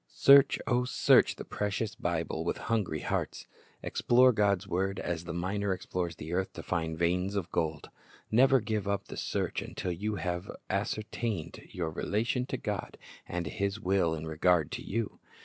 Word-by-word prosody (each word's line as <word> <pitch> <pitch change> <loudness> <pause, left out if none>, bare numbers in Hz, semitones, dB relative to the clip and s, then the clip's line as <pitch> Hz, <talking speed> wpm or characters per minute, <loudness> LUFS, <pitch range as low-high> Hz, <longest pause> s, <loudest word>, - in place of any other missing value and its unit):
Search, 140 - +6
O 125 -1 +2
search 125 - +4
the - - -8
precious 105 +1 -2
Bible 85 -2 -2
with 85 - -1
hungry 105 -9 -1
hearts. - - -2 0.4
Explore 125 +1 +4
God's 100 -3 +2
word 95 +1 -1
as 85 -1 -3
the 85 - -4
miner 95 +3 -1
explores 90 -2 -3
the 80 +2 -6
earth 95 +1 0
to - - -8
find 80 -2 -2
veins 90 +4 +1
of 90 -4 -2
gold. 80 -2 -2 0.4
Never 130 +4 +6
give 105 -2 -2
up 100 -1 -2
the - - -6
search - - -2
until 90 - -4
you 105 +5 -2
have 90 -1 -3 0.2
ascertained 105 -3 -2
your 85 -3 -3
relation 115 +9 -1
to - - -2
God - - -4 0.3
and 85 0 -3
His 100 +5 -2
will 90 -5 +1
in 80 0 -6
regard 80 0 +2
to - - -4
you. 115 +1 -3
95 Hz, 165 wpm, -30 LUFS, 85-105 Hz, 0.4 s, Search